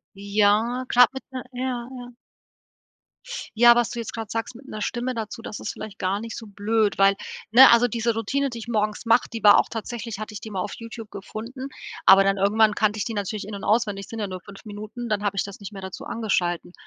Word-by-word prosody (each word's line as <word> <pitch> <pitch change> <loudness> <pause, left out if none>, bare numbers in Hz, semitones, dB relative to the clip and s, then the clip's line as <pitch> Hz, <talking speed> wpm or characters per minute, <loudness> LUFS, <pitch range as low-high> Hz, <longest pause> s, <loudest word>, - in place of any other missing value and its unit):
Ja, 210 +5 +2
grad 245 0 +6
mit 265 - -6
'ne 255 -1 -4
ja, 250 -1 -3
ja. 245 -1 -9 1.4
Ja, 240 +1 +8
was 240 -2 +1
du 240 - -5
jetzt 230 - -5
grad 225 -2 -5
sagst 225 +2 -3
mit 265 +3 -14
'ner 215 - -6
Stimme 245 +3 -2
dazu, 225 +1 -5
das 215 - -6
ist - - -4
vielleicht 215 -2 -9
gar 195 +1 -1
nicht 230 0 -6
so 225 - -8
blöd, 210 +1 0
weil 195 0 +5 0.3
ne, 255 +4 +9
also 240 +1 +5
diese 230 0 0
Routine, 275 +6 -1
die 235 -3 -7
ich 230 - -9
morgens 215 0 -1
mache, 230 +2 +4
die 230 -1 -5
war 205 - +8
auch - - +2
tatsächlich 230 -1 -5
hatte 215 - -6
ich 210 - -6
die 220 - -8
mal 190 - -2
auf - - -4
YouTube 230 -1 -9
gefunden, 230 +7 -7 0.4
aber 195 0 +9
dann 195 0 +2
irgendwann 210 +2 +3
kannte 215 0 +1
ich 205 - -1
die 225 - -4
natürlich 205 +1 -3
in 210 - -6
und 200 - -8
auswendig, 205 -3 +1
sind 225 - -7
ja 205 - -2
nur 185 -1 -6
5 200 +4 -13
Minuten, 215 +3 -7
dann 210 -1 -1
habe 200 -1 -1
ich - - +2
das 200 0 -8
nicht 200 0 -9
mehr 195 - -9
dazu 190 0 -7
angeschaltet. 175 -6 -1
220 Hz, 235 wpm, -24 LUFS, 205-235 Hz, 1.4 s, ne